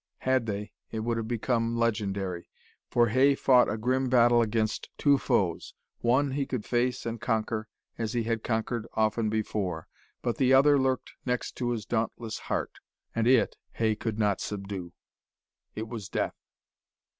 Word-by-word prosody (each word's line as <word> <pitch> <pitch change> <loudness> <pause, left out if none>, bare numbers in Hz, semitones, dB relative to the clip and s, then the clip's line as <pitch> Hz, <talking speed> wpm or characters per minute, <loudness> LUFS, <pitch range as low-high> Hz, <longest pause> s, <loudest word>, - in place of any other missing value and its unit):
Had 130 -3 +1
they, 105 0 -4 0.2
it 110 - -3
would 115 +1 -1
have 115 -1 -3
become 115 0 0
legendary. 100 -6 -1 0.4
For 120 -1 +3
Hay 135 +5 +4
fought 125 -2 +5
a 110 - -2
grim 130 +3 0
battle 120 -1 +5
against 110 -1 -1
two 140 -2 +4
foes. 90 -9 0 0.2
One, 130 +4 +2
he 140 0 -1
could 125 -5 -3
face 125 +1 0
and 115 -1 -4
conquer, 110 -1 -1 0.3
as 115 +1 -2
he 120 -1 0
had 115 -1 -1
conquered 115 0 -1
often 110 0 +1
before. 100 -6 -2 0.4
But 120 -2 -1
the 130 -1 +4
other 140 +1 +6
lurked 130 -1 0
next 125 -1 -1
to 120 -1 -1
his 115 -3 -2
dauntless 115 -1 -2
heart, - - -2 0.3
and 115 0 +1
it 125 -2 +4 0.2
Hay 110 -1 +1
could 110 0 -3
not 105 -3 +1
subdue. 95 -3 -5 0.8
It 110 +1 -4
was 110 -4 -6
death. - - -1
115 Hz, 160 wpm, -28 LUFS, 110-125 Hz, 0.8 s, other